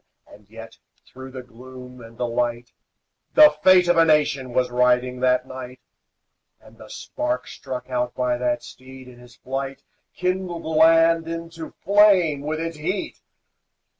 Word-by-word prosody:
And 105 -1 -19
yet, 115 +1 -12 0.3
through 130 0 -12
the 130 -1 -9
gloom 125 +1 -13
and 115 0 -15
the 125 - -2
light, 120 0 -3 0.6
The 305 0 +8
fate 185 -1 +5
of 175 -1 +2
a 165 - +6
nation 145 -5 +1
was 125 0 0
riding 125 0 +1
that 125 0 +1
night; 130 -1 -9 0.8
And - - -20
the - - -13
spark 305 +1 -4
struck 125 -1 -8
out 125 -1 -3
by 125 -1 -1
that 120 -1 -1
steed, 130 0 -13
in 125 -1 -15
his 125 -1 -17
flight, 135 +1 -6 0.3
Kindled 180 -2 -3
the - - -6
land 165 +1 +4
into 165 -1 -8
flame 190 -7 +4
with 155 +2 -4
its 165 -1 -5
heat. 185 +6 -4
130 Hz, 155 wpm, -22 LUFS, 125-165 Hz, 0.8 s, The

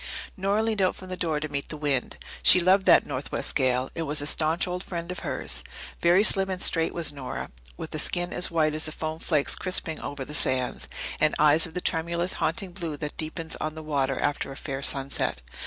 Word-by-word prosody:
Nora 200 +3 +1
leaned 220 -3 0
out 185 - +2
from 185 - -11
the 185 - -3
door 160 -4 -1
to 155 - -3
meet 140 -1 -4
the 155 - -4
wind. 145 -4 -1 0.2
She 185 - +8
loved 185 +2 +3
that - - +7
northwest - - -2
gale; 130 0 +1
it 165 - -4
was 150 -1 0
a 145 - +1
staunch 160 +4 +2
old 180 +1 -3
friend 170 -1 -5
of 180 - -5
hers. 60 0 -2 0.4
Very 175 +4 +5
slim 195 -2 +3
and 185 -1 -3
straight 165 -2 +2
was 165 -4 +1
Nora, 135 -3 -6 0.3
with - - -6
a - - -1
skin 175 0 +2
as 180 - +2
white 155 -3 +2
as 155 +1 -2
the 155 - -3
foam 155 0 -4
flakes 150 -5 +1
crisping 180 -4 -2
over 140 -2 -5
the 150 - -9
sands, 130 -3 -1 0.3
and 155 - +3
eyes 150 +3 +4
of 160 - -15
the 180 - -2
tremulous, 170 +2 0
haunting 195 -5 0
blue 170 -5 -3
that 150 0 -5
deepens 160 +1 -3
on 155 0 -4
the 160 - -7
water 135 -3 0
after 145 -1 -1
a - - -8
fair 135 -2 -5
sunset. 135 - -1
160 Hz, 220 wpm, -26 LUFS, 145-180 Hz, 0.4 s, She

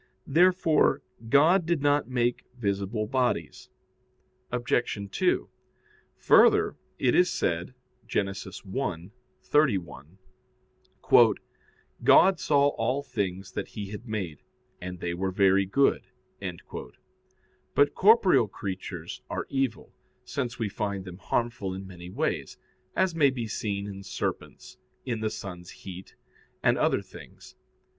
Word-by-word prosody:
Therefore 175 0 +3 0.3
God 160 +7 +5
did 165 -4 0
not 145 -2 +2
make 120 -1 0
visible 100 0 -1
bodies. 125 +2 -1 0.8
Obj. 120 -4 -1
2: - - +1 0.7
Further, - - +5 0.2
it 125 - +2
is 180 0 +4
said 85 +8 -2 0.3
(Gen. 105 - +1
1:31): 95 - -2 2.0
"God 190 -2 +6
saw 145 -1 +3
all 130 +2 -1
things 95 -6 -3
that - - -4
He 100 -2 -7
had 110 +3 -8
made, 95 -9 -4 0.4
and 90 0 -6
they 85 -1 -2
were 95 +2 -1
very 95 0 +3
good." 140 +8 +2 1.7
But 145 - +4
corporeal 190 - +5
creatures 95 -1 -6
are - - -3
evil, 135 -5 -2 0.3
since 125 -2 -3
we 115 - -1
find 100 -1 -3
them 90 0 -9
harmful 110 -6 -2
in 95 +1 -7
many 90 -2 -10
ways; - - -2 0.4
as 190 -2 +2
may 150 -4 +4
be 125 -3 -3
seen 100 -2 -3
in 100 -1 -7
serpents, 95 -1 -5 0.3
in 120 -4 -2
the 110 0 -1
sun's 90 -4 -8
heat, 95 0 -10 0.5
and - - +4
other - - +2
things. - - -14
110 Hz, 115 wpm, -27 LUFS, 95-135 Hz, 2.0 s, God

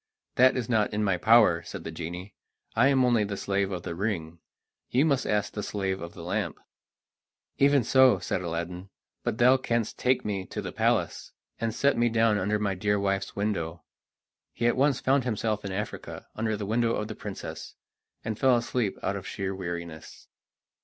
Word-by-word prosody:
"That 130 +1 +5
is 120 -3 -2
not 110 -4 +2
in 105 0 0
my 95 -3 +2
power," 110 -6 +5
said - - -8
the 80 - -5
genie; 90 +4 -6 0.4
"I 120 +4 +5
am 135 -2 +4
only 120 -3 +3
the 100 -1 -4
slave 100 0 0
of 90 -2 -4
the 90 - -4
ring; 85 -4 -3 0.5
you 130 +5 +3
must 140 -4 +1
ask 105 -1 0
the 105 - -3
slave 95 -2 -2
of 85 0 -8
the - - -9
lamp." - - -2 1.0
"Even 140 -1 +5
so," 130 +2 +5
said - - -2
Aladdin 90 +2 -4 0.3
"but - - -1
thou 125 +3 +6
canst 115 -3 -2
take 125 0 +1
me 100 -3 -2
to - - -6
the - - -4
palace, - - 0 0.3
and 115 0 -1
set 140 +3 +1
me 120 0 +3
down 110 -2 +3
under 105 +3 +1
my 105 -2 0
dear 105 +2 0
wife's 100 -1 -1
window." 90 -6 -2 0.7
He 120 - -2
at 120 - +3
once 135 0 +2
found 135 0 +2
himself 110 -3 -1
in 100 - -4
Africa, 100 +3 -5
under 110 -1 -1
the 105 - -4
window 115 +2 +1
of 105 - -3
the - - -5
princess, - - -7 0.5
and 110 -1 -3
fell 130 -2 +5
asleep 120 -3 -1
out 100 - 0
of 100 -1 -6
sheer 95 -1 -3
weariness. 85 -4 -7
105 Hz, 190 wpm, -27 LUFS, 95-120 Hz, 1.0 s, thou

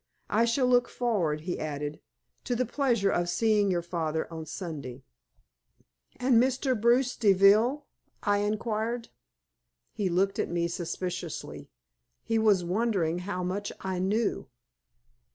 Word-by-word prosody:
I 230 +2 +4
shall 235 +3 +2
look 245 -1 +3
forward," 180 -11 0
he 175 +3 -4
added, 150 0 -4 0.5
"to 245 - -1
the 255 +2 +1
pleasure 235 -6 +1
of 175 0 0
seeing 210 +2 +2
your 175 -2 0
father 160 -2 -2
on 160 -1 -6
Sunday." 145 -7 -6 1.1
"And 250 -2 +4
Mr. 260 +1 +1
Bruce 240 +3 +2
Deville?" 215 +7 +4 0.4
I 205 0 +2
inquired. 220 +2 -2 0.8
He 205 -4 -1
looked 190 +3 +1
at - - 0
me 170 0 0
suspiciously. 175 0 -5 0.5
He 225 0 0
was 210 -5 +4
wondering 180 -3 0
how 180 0 -4
much 195 +3 -3
I 190 -1 -3
knew. 205 +4 0
200 Hz, 130 wpm, -28 LUFS, 175-230 Hz, 1.1 s, I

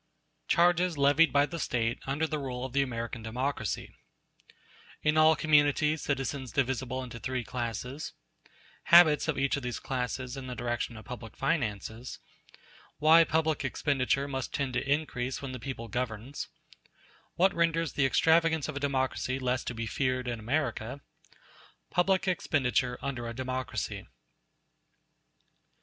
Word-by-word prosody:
] - - -47
Charges 175 -1 +3
Levied 145 +4 +5
By 140 0 +4
The 170 +2 -6
State 115 -5 -1
Under 140 +4 0
The 155 -1 -2
Rule 130 -2 -4
Of 130 - -7
The 140 - +3
American 115 -2 -3
Democracy 110 - -3 1.1
In 150 0 +3
all 155 0 +6
communities 150 0 +3
citizens 135 -2 -2
divisible 130 -1 -1
into 120 -2 -8
three 130 0 -2
classes—Habits 125 - +1
of 160 - 0
each 140 +1 +1
of - - -4
these 125 -1 -3
classes 125 0 -3
in 135 -1 -7
the 125 - -5
direction 120 -1 -3
of 110 - -11
public 115 -3 -8
finances—Why 135 - 0
public 160 -2 +1
expenditure 135 0 0
must 135 -2 -4
tend 140 -3 -1
to 125 +3 -1
increase 135 -4 -1
when 135 -2 -6
the 130 - -6
people 115 -1 -6
governs—What 125 - -4
renders 165 -2 +1
the 135 -2 +3
extravagance 160 +2 +3
of - - -5
a - - -2
democracy 130 -2 -1
less 130 -1 -1
to 120 - -4
be 115 0 -3
feared 130 +2 -1
in 120 -2 -2
America—Public 140 - -3
expenditure 130 -8 +1
under 120 -4 -3
a 115 - -6
democracy. 130 0 -3
130 Hz, 135 wpm, -30 LUFS, 125-150 Hz, 1.1 s, all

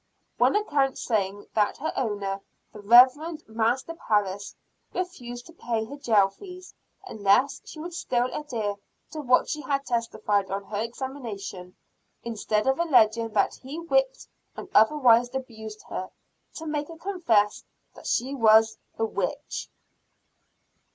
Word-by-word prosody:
One - - +4
account 290 -10 +1
saying 205 -3 -1
that 210 -2 +1
her 315 - -3
owner, 205 -5 -2 0.3
the 210 - -10
Rev. 255 +10 +6
Master 230 +7 0
Parris, 205 - -1 0.4
refused 245 -10 -5
to 330 - -14
pay 230 -7 -2
her 280 - -8
jail 220 -8 +3
fees, 365 - -12 0.3
unless 220 - +2
she 310 - -10
would 345 +3 -6
still 245 -7 0
adhere 225 -9 -3 0.3
to 310 - -5
what 255 -3 +3
she 300 - -3
had 275 0 -1
testified 215 -4 0
on 195 +1 -3
her 205 +1 -4
examination, 230 -7 -6 0.5
instead 215 -2 -1
of 265 +2 +2
alleging 230 -8 +4
that - - +2
he 270 +4 -7
whipped - - 0 0.3
and - - -7
otherwise 245 0 +5
abused 220 -5 -7
her, 185 - -4 0.5
to 320 - -7
make 300 -1 -2
her 330 - -10
confess 280 - +1 0.3
that - - -11
she 255 +3 0
was 220 -3 +5 0.2
a 225 - +1
witch. 195 -4 -3
240 Hz, 140 wpm, -26 LUFS, 210-290 Hz, 0.5 s, Rev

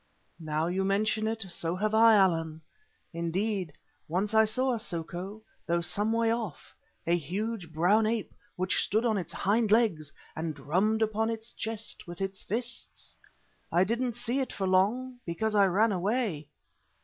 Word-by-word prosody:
"Now 155 -1 -1
you 185 +3 0
mention 215 +3 +1
it, 225 -2 -3
so 170 0 -2
have 215 +3 -1
I, 225 0 +7
Allan. 165 -5 +2 0.5
Indeed, 180 +1 -1 0.3
once 190 +6 -1
I 220 0 +6
saw 255 +4 0
a 235 - -2
soko, 185 +1 -5 0.2
though 170 0 +1
some 205 +5 0
way 230 0 +2
off, 225 -9 -5 0.3
a 170 - +3
huge, 185 +2 -3
brown 190 +7 +3
ape 225 -1 -2 0.2
which 185 0 +1
stood 220 +4 +1
on 220 -4 +2
its 175 - -6
hind 215 +2 +1
legs 190 -11 +2 0.2
and 160 -1 -3
drummed 190 +10 +1
upon 220 +1 0
its 225 0 -5
chest 225 -3 -5
with 175 0 -8
its 195 0 -3
fists. 235 +3 -4 0.6
I 175 +2 +4
didn't 235 +4 -1
see 240 +2 -1
it 265 - -2
for 195 - -3
long 230 +8 +1
because 210 +6 -2
I 200 -2 +5
ran 210 +5 +3
away." 195 - -1
205 Hz, 160 wpm, -29 LUFS, 175-225 Hz, 0.6 s, I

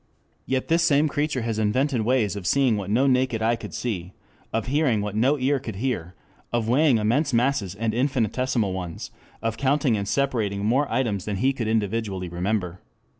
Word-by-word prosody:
Yet 130 -1 -1
this 165 +1 +3
same 155 -2 +3
creature 145 -4 -1
has 115 -1 -2
invented 125 +4 +1
ways 110 -3 +1
of 95 -3 -5
seeing 135 -5 +3
what 100 -2 -4
no 120 +6 +3
naked 125 -4 +1
eye 115 +1 +3
could 115 - -9
see, 95 -6 -4 0.4
of 115 -1 -1
hearing 130 -4 +1
what 105 0 -4
no 130 +7 +3
ear 135 +1 +1
could 115 -5 -7
hear, 95 -7 -3 0.4
of 120 -2 0
weighing 135 +1 +4
immense 125 +7 +1
masses 115 -6 +1
and 110 +1 -1
infinitesimal 125 -4 0
ones, 90 -3 -6 0.3
of 115 -1 -1
counting 135 -2 +2
and 100 -1 -3
separating 110 -7 0
more 135 +6 +1
items 105 -8 0
than 105 - -2
he 130 +7 +1
can 115 -4 -3
individually 105 -4 -1
remember. 90 0 -2
115 Hz, 180 wpm, -24 LUFS, 105-135 Hz, 0.4 s, weighing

